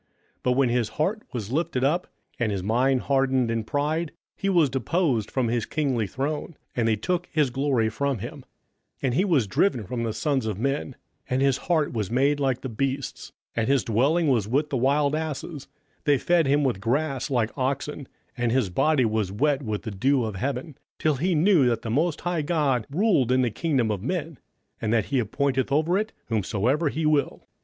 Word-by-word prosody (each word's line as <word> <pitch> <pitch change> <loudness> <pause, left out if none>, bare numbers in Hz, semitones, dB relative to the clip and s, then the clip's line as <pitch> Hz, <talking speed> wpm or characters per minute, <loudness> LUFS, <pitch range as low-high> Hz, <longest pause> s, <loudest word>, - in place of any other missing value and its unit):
27:005:020 - - -45 0.3
But 125 - +1
when 130 -1 +3
his 120 -2 +1
heart 190 - -1
was 115 -4 -5
lifted 135 -3 0
up, 160 +6 +1 0.3
and 115 -3 +1
his 95 -2 -2
mind 125 +5 +2
hardened 135 -3 +1
in 115 -1 -1
pride, 150 +6 -1 0.2
he 195 - -1
was 170 -6 +4
deposed 135 - 0
from 130 -3 0
his 115 -1 -1
kingly 130 -8 0
throne, 145 - -3 0.2
and 115 -2 +1
they 110 - +3
took 175 - -2
his 150 -5 +2
glory 135 -3 +1
from 140 +4 -1
him: - - -7
27:005:021 - - -14 0.6
And 130 -3 +1
he 185 +10 +2
was 155 - +3
driven 120 - +1
from 120 +3 -4
the 115 -2 -1
sons 135 -5 0
of 105 -4 -2
men; 135 +2 -2 0.3
and 130 +2 +1
his 135 -1 +3
heart 155 -5 +2
was 105 -5 -2
made 140 +4 +2
like 130 -3 0
the - - -4
beasts, 135 +4 -3 0.2
and 115 -1 0
his 140 0 +3
dwelling 140 +9 +2
was 115 -7 +2
with 145 +6 0
the 135 - +1
wild 140 +3 +2
asses: 155 -2 -4 0.4
they 145 -2 +4
fed 170 +2 +2
him 145 +2 +3
with 120 -8 0
grass 135 +3 -1
like 120 -5 0
oxen, 135 +1 -2 0.3
and 120 -2 0
his 120 -7 +1
body 145 - +3
was 110 -3 0
wet 140 +6 +1
with 110 -5 -3
the 110 - -4
dew 130 +7 +2
of 110 -2 -4
heaven; 135 - -3 0.2
till 155 -3 +1
he 175 +5 +1
knew 160 -4 +4
that 115 -1 0
the 115 - -3
most 155 +6 +1
high 175 -2 -1
God 145 -8 0
ruled 155 - +2
in 130 0 +3
the 120 - 0
kingdom 130 -6 0
of 100 -3 -3
men, 160 - -3 0.4
and 110 - -1
that 115 -3 +2
he 135 - +4
appointeth 130 +4 0
over 160 +5 +2
it 215 +2 0 0.2
whomsoever 115 - +1
he 160 +2 -2
will. 150 -2 +1
135 Hz, 205 wpm, -25 LUFS, 115-150 Hz, 0.6 s, was